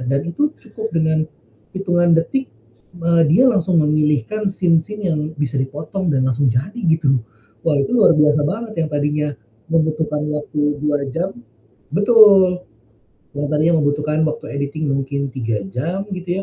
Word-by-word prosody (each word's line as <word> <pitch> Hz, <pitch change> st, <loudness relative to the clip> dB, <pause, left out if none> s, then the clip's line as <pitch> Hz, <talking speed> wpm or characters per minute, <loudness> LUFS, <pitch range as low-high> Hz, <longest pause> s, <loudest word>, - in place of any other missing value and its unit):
dan 140 Hz, 0 st, +1 dB
itu 290 Hz, -, 0 dB
cukup 225 Hz, -1 st, -7 dB
dengan, 160 Hz, -1 st, +1 dB, 0.5 s
hitungan 175 Hz, -2 st, +1 dB
detik, 265 Hz, +11 st, -2 dB, 0.5 s
eee, 170 Hz, 0 st, +3 dB
dia 220 Hz, +11 st, +5 dB
langsung 185 Hz, -7 st, +2 dB
memilihkan 150 Hz, -, +1 dB
scene 170 Hz, -4 st, +2 dB
scene 210 Hz, +3 st, -6 dB
yang 155 Hz, -, 0 dB, 0.2 s
bisa 145 Hz, -4 st, -2 dB
dipotong 155 Hz, +7 st, -4 dB
dan 130 Hz, -2 st, +1 dB
langsung 130 Hz, +1 st, +1 dB
jadi 140 Hz, -, -2 dB
gitu. 140 Hz, -6 st, +2 dB, 0.4 s
Wah, 150 Hz, -3 st, +1 dB
itu 140 Hz, -, -1 dB
luar 205 Hz, -6 st, +6 dB
biasa 150 Hz, 0 st, +4 dB
banget 215 Hz, +7 st, -3 dB
yang 155 Hz, -, -3 dB
tadinya, 150 Hz, 0 st, 0 dB, 0.4 s
membutuhkan 155 Hz, -2 st, 0 dB
waktu 150 Hz, -1 st, -3 dB, 0.2 s
2 145 Hz, -1 st, -1 dB
jam 175 Hz, +8 st, -3 dB, 0.6 s
betul. 195 Hz, -2 st, +5 dB, 0.7 s
Yang 145 Hz, 0 st, -3 dB
tadinya 155 Hz, +3 st, +2 dB
membutuhkan 150 Hz, +1 st, 0 dB
waktu 155 Hz, 0 st, -4 dB
editing 145 Hz, +1 st, -3 dB
mungkin 140 Hz, 0 st, -2 dB
3 115 Hz, -5 st, -3 dB
jam 170 Hz, -, -3 dB
gitu 180 Hz, 0 st, -3 dB
155 Hz, 145 wpm, -19 LUFS, 145-185 Hz, 0.7 s, luar